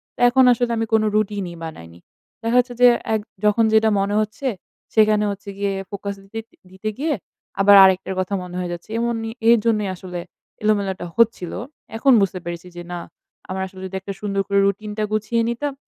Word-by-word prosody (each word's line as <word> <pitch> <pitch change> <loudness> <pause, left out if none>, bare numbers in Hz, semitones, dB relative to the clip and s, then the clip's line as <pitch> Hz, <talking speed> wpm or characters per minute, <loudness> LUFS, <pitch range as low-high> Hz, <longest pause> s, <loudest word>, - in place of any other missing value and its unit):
তা - - -8
এখন 260 +2 +4
আসলে 245 0 +1
আমি 225 - 0
কোনো 220 -1 +4
রুটিনই 200 -4 -1
বানাইনি। 85 - -9 0.4
দেখা 230 +2 +2
যাচ্ছে 245 0 0
যে 250 - +9 0.3
এগ 220 - +2 0.3
যখন 210 +2 +4
যেটা 220 0 +5
মনে 200 +1 0
হচ্ছে 215 +6 -4 0.5
সেখানে 215 -1 +4
হচ্ছে 200 +1 -8
গিয়ে 200 0 -1 0.2
ফোকাস 200 0 -5
দিতে 195 +3 -7
দি - - -27 0.2
দিতে 190 +3 -4
গিয়ে 300 +3 0 0.5
আবার 200 +1 +7
আরেকটার 190 0 +3
কথা 185 +2 -2
মনে 180 0 -9
হয়ে 180 -1 -3
যাচ্ছে। 170 +3 -9
এমনই 230 -1 -2 0.2
এর 235 - +7
জন্যই 210 -3 +1
আসলে 180 -1 -7 0.4
এলোমেলোটা 200 -4 0
হচ্ছিলো। 225 -7 +1 0.4
এখন 270 +4 +4
বুঝতে 190 -1 0
পেরেছি 175 +1 -6
যে 175 - -6
না 175 - -3 0.5
আমার 190 0 -3
আসলে 190 0 -12
যদি 190 0 -7
একটা 195 +1 -5
সুন্দর 200 -1 -1
করে 200 0 +2
রুটিনটা 210 +2 -2
গুছিয়ে 215 +2 0
নিতাম, 280 +5 -2
205 Hz, 185 wpm, -21 LUFS, 190-225 Hz, 0.5 s, যে